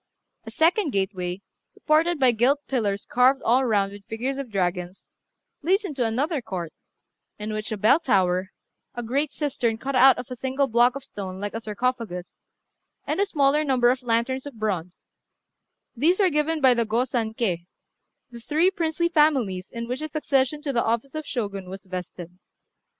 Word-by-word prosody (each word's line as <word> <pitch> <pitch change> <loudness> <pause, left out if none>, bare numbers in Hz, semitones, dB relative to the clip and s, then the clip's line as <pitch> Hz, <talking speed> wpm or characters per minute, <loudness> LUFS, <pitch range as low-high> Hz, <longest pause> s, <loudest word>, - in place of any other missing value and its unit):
A - - -7
second 340 +2 +2
gateway, 190 -2 -2 0.3
supported 315 +2 +1
by 260 -2 +5
gilt 250 +5 +2
pillars 205 -7 -1
carved 255 +2 +3
all 250 +3 +3
round 200 -4 +1
with 200 0 -11
figures 255 +5 -3
of 275 -3 -5
dragons, 180 -2 -2 0.6
leads 385 +7 +1
into 285 -8 -2
another 270 +7 0
court, 180 -7 -5 0.6
in 210 +1 -5
which 215 0 -4
are - - 0
a - - -9
bell 220 +9 +4
tower, 185 - +1 0.5
a 240 - -4
great 275 +6 -1
cistern 250 -6 -1
cut 270 +4 -4
out 265 +1 +7
of 245 - -5
a - - -3
single 265 +3 0
block 240 0 +3
of 275 - -6
stone 190 -2 -7
like 205 +1 -4
a 225 - -4
sarcophagus, 220 -4 -3 0.6
and - - -2
a 400 - +2
smaller 290 -3 +2
number 255 -4 +3
of 255 +1 -2
lanterns 250 +3 -1
of 285 - -9
bronze; 185 -5 -4 0.9
these 325 - +2
are 380 -3 +4
given 305 +1 0
by 260 -2 +6
the 235 -1 +1
Go 230 +3 0
San 225 -4 -2
Ké, 180 -7 -1 0.6
the 235 - -9
three 315 +10 +2
princely 340 -2 0
families 265 - +2
in 235 0 -6
which 250 +2 -3
the 310 - -4
succession 295 -1 0
to 280 - -2
the 235 - +2
office 235 +4 -1
of 310 -1 -5
Shogun 200 -6 -4
was 190 0 -9
vested. 180 -1 -8
245 Hz, 180 wpm, -24 LUFS, 205-280 Hz, 0.9 s, out